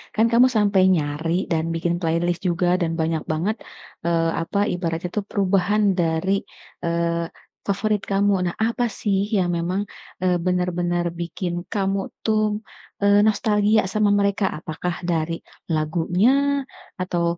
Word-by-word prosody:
kan 220 - +4
kamu 245 +2 +6
sampai 200 -2 +4
nyari 155 +1 -1 0.2
dan 160 -1 +1
bikin 170 +1 0
playlist 170 +1 0
juga 175 0 +1
dan 165 - +1
banyak 160 0 0
banget, 175 +8 0 0.5
eee, 165 -1 +2
apa, 165 +5 -3 0.2
ibaratnya 170 0 -2
itu 210 - -1
perubahan 200 +1 +2 0.2
dari, 165 +3 +1 0.5
eee, 170 0 0 0.4
favorit 205 +1 0
kamu. 200 +1 +3 0.2
Nah, - - -13
apa 230 +2 +1
sih 200 -2 +1 0.2
yang 180 -2 +1
memang, 180 +4 -1 0.4
eee, 180 -1 +3
benar-benar 175 -1 0
bikin 175 +1 -3 0.2
kamu 195 -2 0 0.2
tuh, 215 -1 +1 0.4
eee, 200 0 +5
nostalgia 215 0 +3
sama 215 -1 +3
mereka? 200 0 +1
Apakah 170 +3 -4 0.2
dari 165 0 -1 0.3
lagunya? 165 +7 +2 0.7
Atau 180 -2 -1
180 Hz, 130 wpm, -23 LUFS, 170-205 Hz, 0.7 s, kamu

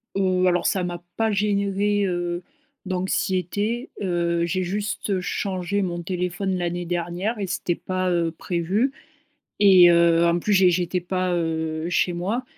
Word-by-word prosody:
Heu, 185 -1 +2
alors 175 -1 +1
ça 190 - +1
m'a 175 -1 -4 0.2
pas 225 -1 +1
généré, 200 0 +1
heu, 175 -1 -2 0.4
d'anxiété. 190 - -1
Heu, 170 -2 0
j'ai 185 +2 -1
juste 200 +1 -2
changé 190 +1 -2
mon 175 -2 -2
téléphone 180 +1 -2
l'année 175 0 -2
dernière 175 +6 -2
et 195 - -2
c'était 175 -1 -1
pas, 185 +1 -2
heu, 170 -2 +1
prévu. 185 +10 -1 0.7
Et 185 -4 +8
heu, 170 0 +4
en 170 0 +2
plus, 205 +4 0
j'é 190 -1 +6
j'étais 180 +1 0
pas, 185 0 -1
heu, 160 -1 -2
chez 175 0 +1
moi. 200 +9 -2
180 Hz, 150 wpm, -23 LUFS, 175-195 Hz, 0.7 s, Et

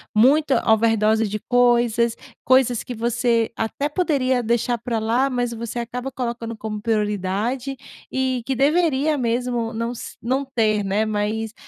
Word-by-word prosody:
muita 275 +6 +4
overdose 220 0 +2
de 210 +1 -3
coisas, 240 -2 +3 0.3
coisas 255 -2 +3
que 245 - -6
você 235 0 +1
até 225 +6 -2
poderia 280 -7 +1
deixar 235 +1 0
pra 235 0 -2
lá, 235 +5 +1
mas 245 -2 -1
você 235 +1 -6
acaba 245 +3 -4
colocando 235 -3 -4
como 215 -1 -5
prioridade 215 +4 -1 0.4
e 260 -1 0
que 265 +3 -2
deveria 300 +1 +2
mesmo 240 -1 -1
não 230 +1 -3
s 245 - -8
não 260 +4 -1
ter, 215 -3 +2
né, 200 +3 0
mas 215 +1 -2
235 Hz, 145 wpm, -22 LUFS, 220-255 Hz, 0.4 s, muita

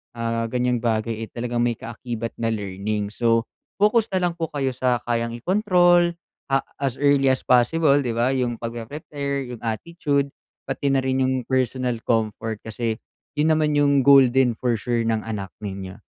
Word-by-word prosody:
ah, 115 0 -1
ganyang 125 +1 0
bagay 115 -1 -1
eh, - - -19
talagang 120 0 -1
may 120 - +1
kaakibat 115 0 -6
na 115 -1 0
learning. 100 0 -3
So, 115 +1 +1 0.3
focus 210 +2 +4
na 185 - +1
lang 175 -1 +1
po 165 - -2
kayo 135 -2 0
sa 125 -1 0
kayang 115 -1 -1
ikontrol, 175 - +3 0.4
ah, 135 - +4 0.2
as 135 -3 -1
early 140 -1 +4
as 130 0 +2
possible, 140 +4 +4
'di 125 -4 -1
ba, 120 +2 +1
yung 125 -3 0
pagpre-prepare, 140 +3 -4
yung 120 -2 -8
attitude 140 +4 -1 0.4
pati 135 +1 -2
na 135 - +3
rin 130 0 +1
yung 130 -1 0
personal 130 -1 0
comfort. 110 -1 -1
Kasi 110 0 -2 0.4
yun 150 +2 +2
naman 155 -1 +2
yung 140 -2 +3
goal 135 -2 +8
din 130 -1 +3
for 120 0 0
sure 120 +2 0
ng 115 -1 +1
anak 100 -4 -5
ninyo. 95 -2 -7
125 Hz, 170 wpm, -23 LUFS, 115-140 Hz, 0.4 s, goal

